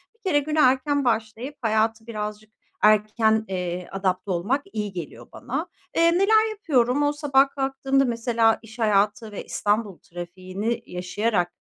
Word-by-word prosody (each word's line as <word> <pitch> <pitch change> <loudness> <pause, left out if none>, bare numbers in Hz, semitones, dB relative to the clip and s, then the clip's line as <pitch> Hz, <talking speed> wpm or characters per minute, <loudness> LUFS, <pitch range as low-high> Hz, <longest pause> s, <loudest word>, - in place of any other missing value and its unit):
bir - - -36
kere 365 -9 +2
güne 305 +2 -2
erken 270 +1 +3
başlayıp 230 +4 -1
hayata 220 0 +1
birazcık 215 -1 -6 0.3
erken, 215 +1 +3
eee, 180 -1 -4
adapte 190 0 -1
olmak 200 +11 0
iyi 210 -2 -3
geliyor 150 -9 -8
bana. 300 +8 -4 0.3
Eee, 335 0 +5
neler 435 +4 +4
yapıyorum? 290 - +1
O 290 0 +2
sabah 280 -2 +3
kalktığımda, 270 0 +1
mesela, 230 -2 +2
iş 225 +1 -14
hayatı 215 0 +1
ve 205 - -6
İstanbul 205 -3 -1
trafiğini 185 +6 -5
yaşayarak, 180 +1 -1
225 Hz, 140 wpm, -24 LUFS, 205-270 Hz, 0.3 s, Eee